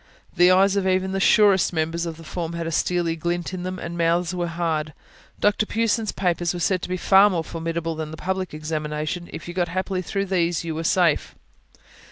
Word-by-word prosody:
The 175 +1 +6
eyes 190 +2 +4
of 195 -1 +1
even 185 0 +1
the 195 - -1
surest 200 -1 +4
members 165 +1 -1
of 160 -1 -6
the 165 - -12
form 165 +1 -4
had 170 0 -4
a 165 - -3
steely 170 0 0
glint 175 +2 -3
in 185 - -4
them, 185 +1 -4
and 170 -1 -6
mouths 170 +1 +1
were 175 -1 -2
hard. 160 -3 -2 0.4
Dr. 210 +1 +2
Pughson's 225 -1 0
papers 175 -2 -1
were - - -4
said 185 +1 +1
to - - -6
be 185 - -1
far 195 +3 +6
more 170 -4 -1
formidable 165 0 -3
than 155 -1 -5
the 160 - -8
public 190 +1 -3
examination: 155 +2 -4
if - - -8
you 175 - -6
got 175 -1 0
happily 185 +2 -2
through 195 +2 -2
these, 175 -3 0
you 165 -1 -3
were 160 +1 -4
safe. 170 -2 +2
175 Hz, 215 wpm, -23 LUFS, 165-185 Hz, 0.4 s, The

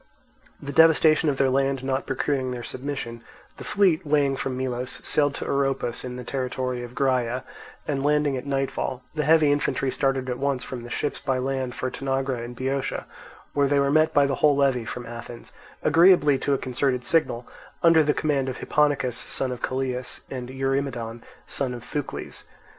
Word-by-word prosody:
The 140 - -6
devastation 160 0 +5
of 140 - -1
their 135 -1 +3
land 135 0 +1
not 130 0 -1
procuring 135 -1 -1
their 125 -1 -5
submission, 125 -4 -5 0.4
the - - -8
fleet, 190 -6 +2
weighing 145 -2 +2
from 130 -1 -3
Melos, 125 -1 -3
sailed 145 -1 +2
to - - -5
Oropus 135 -4 0
in 125 -1 -5
the 125 - -6
territory 125 -1 -3
of 120 0 -9
Graea, 125 -2 0 0.4
and 140 -2 -1
landing 150 -1 +2
at 130 +2 -5
nightfall, 135 -2 -2
the 155 -1 -1
heavy 155 -1 +5
infantry 145 -2 0
started 135 -1 0
at 125 -1 -3
once 140 -2 0
from 125 -2 -6
the 120 - -9
ships 145 - -2
by 135 -2 -1
land 130 -1 -2
for 130 - -3
Tanagra 135 -2 -2
in 120 +1 -7
Boeotia, 135 +2 -2 0.5
where 140 -1 +3
they 145 +1 +2
were 140 0 +2
met 155 +1 +4
by 145 -1 +4
the 135 -1 -1
whole 150 -2 +5
levy 135 -4 +2
from 120 +2 -6
Athens, 115 0 -9 0.3
agreeably 160 -3 +5
to 140 - 0
a - - 0
concerted 125 0 -1
signal, 125 -7 +1 0.4
under 165 -2 +6
the 150 0 +1
command 140 -3 0
of 130 - -5
Hipponicus, 145 -4 +1
son 130 -1 0
of 125 - -6
Callias, 130 -1 -2
and 125 -2 -5
Eurymedon, 130 -3 -2 0.2
son 130 -3 -1
of 120 - -9
Thucles. 145 +1 -5
135 Hz, 180 wpm, -25 LUFS, 125-145 Hz, 0.5 s, under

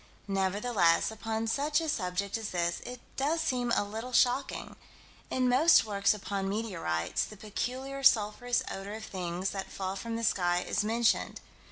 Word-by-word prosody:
Nevertheless, 195 -1 +2
upon 220 0 -3
such 290 +6 +1
a 325 - -3
subject 195 -6 -1
as 225 -2 -3
this, 170 -1 -1
it 250 0 -7 0.2
does 300 +5 +1
seem 250 -6 0
a - - +2
little 225 +5 -6
shocking. 255 +3 +1 0.5
In 255 -1 +1
most 270 +6 +6
works 200 0 +2
upon 195 -1 -3
meteorites, 185 - -1
the 215 - -8
peculiar, 255 +6 -4
sulphurous 240 0 +3
odor 195 +2 -5
of 220 0 -7
things 180 0 -3
that 195 -1 -5
fall 190 0 -3
from 230 +3 -4
the 230 - -3
sky 180 -4 +2
is 215 - +1
mentioned. 230 +2 +1
215 Hz, 160 wpm, -30 LUFS, 195-245 Hz, 0.5 s, most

